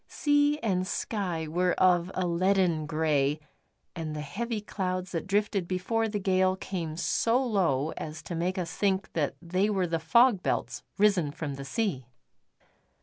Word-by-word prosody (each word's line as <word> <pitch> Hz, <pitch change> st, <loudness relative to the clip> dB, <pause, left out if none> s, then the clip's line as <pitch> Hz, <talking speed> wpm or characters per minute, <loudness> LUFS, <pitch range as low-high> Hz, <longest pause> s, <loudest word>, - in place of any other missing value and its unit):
Sea 290 Hz, 0 st, +2 dB
and 185 Hz, -4 st, 0 dB
sky 180 Hz, -7 st, -2 dB
were 180 Hz, +3 st, +1 dB
of 180 Hz, -1 st, +3 dB
a 185 Hz, -, 0 dB
leaden 175 Hz, -2 st, +1 dB
grey, 150 Hz, -2 st, +1 dB, 0.6 s
and 160 Hz, -3 st, -4 dB
the 150 Hz, -, -4 dB
heavy 215 Hz, +10 st, -3 dB
clouds 185 Hz, -3 st, -3 dB
that 165 Hz, 0 st, -3 dB
drifted 200 Hz, -2 st, 0 dB
before 220 Hz, +5 st, 0 dB
the 210 Hz, -, -2 dB
gale 185 Hz, -1 st, +2 dB
came 170 Hz, -5 st, -5 dB
so 230 Hz, +6 st, +2 dB
low 165 Hz, -, +1 dB
as 155 Hz, 0 st, -6 dB
to -, -, -6 dB
make 175 Hz, +3 st, -1 dB
us 180 Hz, -2 st, -3 dB
think 195 Hz, -1 st, 0 dB
that 150 Hz, -4 st, -1 dB
they 185 Hz, +4 st, +1 dB
were 195 Hz, -3 st, +1 dB
the 165 Hz, -1 st, -1 dB
fog 225 Hz, +6 st, +4 dB
belts -, -, -2 dB, 0.2 s
risen 195 Hz, -7 st, +3 dB
from 145 Hz, -1 st, -5 dB
the 135 Hz, 0 st, -7 dB
sea. 150 Hz, -, -2 dB
185 Hz, 160 wpm, -28 LUFS, 160-200 Hz, 0.6 s, fog